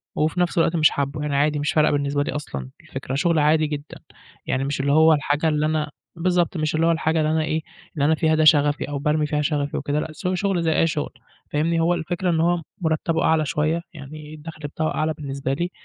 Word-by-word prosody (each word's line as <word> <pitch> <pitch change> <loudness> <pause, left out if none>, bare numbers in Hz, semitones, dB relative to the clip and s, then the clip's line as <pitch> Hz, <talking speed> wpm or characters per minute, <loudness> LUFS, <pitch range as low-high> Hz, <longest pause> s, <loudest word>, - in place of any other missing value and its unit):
وفي 155 +3 0
نفس 175 -1 0
الوقت 165 0 +3
مش 155 -2 +5
حابّه، 140 +1 -3
يعني 150 -1 -2
عادي 150 +1 +2
مش 145 - 0
فارقة 155 -1 +4
بالنسبة 145 0 0
لي - - -3
أصلًا 70 - -5
الفكرة 135 - -6
شغل 165 +2 +2
عادي 155 +1 +3
جدًا، 150 -1 -6 0.5
يعني 130 - -1
مش 140 0 -2
اللي 140 +1 +1
هو 160 +2 +6
الحاجة 145 +1 0
اللي 150 0 +1
أنا 155 -1 -1 0.3
بالضبط 175 0 +1
مش 155 0 -1
اللي 160 +1 +2
هو - - +4
الحاجة 160 0 +1
اللي 155 0 +1
أنا 160 0 +1
إيه 155 +1 -1 0.3
اللي 145 -2 +1
أنا 160 +2 +4
فيها 160 -1 +2
ده 155 - +2
شغفي 145 -2 +4
أو 145 -1 -3
بارمي 150 +1 +1
فيها 150 0 -1
شغفي 145 -1 -1
وكده، 145 +1 -1
لأ 155 - -4
س 155 +4 -5
شغل 185 -1 0
زي 160 -1 +2
أي 165 - +4
شغل، 155 -2 -2 0.4
فاهمني 165 +3 +1
هو 165 +2 +3
الفكرة 175 +2 -2
إن 165 -2 +1
هو 170 +1 +2 0.2
مرتبه 160 0 0
أعلى 160 -1 +3
شوية 155 +3 0
يعني 150 0 -10
الدخل 155 0 -8
بتاعه 155 +2 -2
أعلى 155 +1 0
بالنسبة 140 -2 -4
لي، 175 +5 -2
155 Hz, 230 wpm, -23 LUFS, 145-160 Hz, 0.5 s, هو